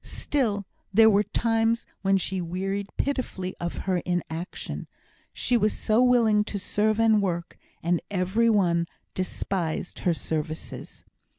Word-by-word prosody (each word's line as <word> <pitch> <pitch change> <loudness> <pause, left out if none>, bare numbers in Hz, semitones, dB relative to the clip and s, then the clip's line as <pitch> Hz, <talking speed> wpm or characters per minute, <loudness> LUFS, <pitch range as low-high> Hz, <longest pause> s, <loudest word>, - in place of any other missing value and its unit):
Still 215 -9 -1 0.3
there 220 +2 +7
were 200 0 +4
times 225 +1 +1 0.2
when 195 0 +3
she 190 0 -1
wearied 195 +3 -2
pitifully 250 -9 -2
of 175 0 -3
her 185 -2 +2
inaction. 175 0 -4 0.4
She 250 - 0
was 215 -2 +3
so 220 +2 +2
willing 230 -4 +4
to 210 - -3
serve 210 +2 +1
and 220 -2 +5
work, 175 -3 -2 0.3
and 170 0 +1
every 200 +4 +2
one 170 -6 +2 0.3
despised 185 -2 -2
her 175 - +2
services. 155 0 -5
195 Hz, 130 wpm, -26 LUFS, 175-220 Hz, 0.4 s, there